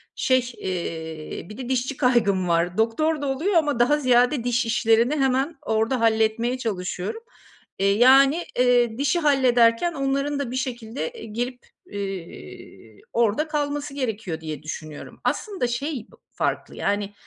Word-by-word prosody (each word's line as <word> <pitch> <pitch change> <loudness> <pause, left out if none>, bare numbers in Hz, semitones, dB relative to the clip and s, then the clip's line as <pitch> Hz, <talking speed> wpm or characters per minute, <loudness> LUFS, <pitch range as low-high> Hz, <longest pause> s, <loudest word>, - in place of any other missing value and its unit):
şey, 255 -1 +1
eee, 160 -3 -5
bir 210 - -10
de 255 -2 -6
dişçi 260 +1 -1
kaygım 215 -8 +2
var. 170 +1 +1
Doktor 290 +8 +1
da 285 - -2
oluyor 300 +10 -1
ama 295 -7 +2
daha 295 +5 +4
ziyade 250 0 +3
diş 245 -1 +1
işlerini 230 +3 +2
hemen 270 +2 +1
orada 225 +1 0
halletmeye 225 +2 +2
çalışıyorum. 195 - -4 0.6
Eee, 195 0 +3
yani, 270 +6 +6 0.2
eee, 245 -2 +3
dişi 285 +5 +1
hallederken 260 0 +3
onların 275 +1 -1
da 270 -4 -3
bir 255 - -4
şekilde, 250 - -4
eee, 470 - -10
girip, 245 +3 -4 0.3
eee, 175 - -8
orada 235 +6 +1
kalması 290 -1 -2
gerekiyor 220 - -3
diye 155 -1 -6
düşünüyorum. 155 -1 -8
Aslında 390 - -1
şey 250 +1 -3
b - - -17 0.2
farklı, - - -2
yani, 205 0 -1
245 Hz, 140 wpm, -24 LUFS, 215-275 Hz, 0.6 s, yani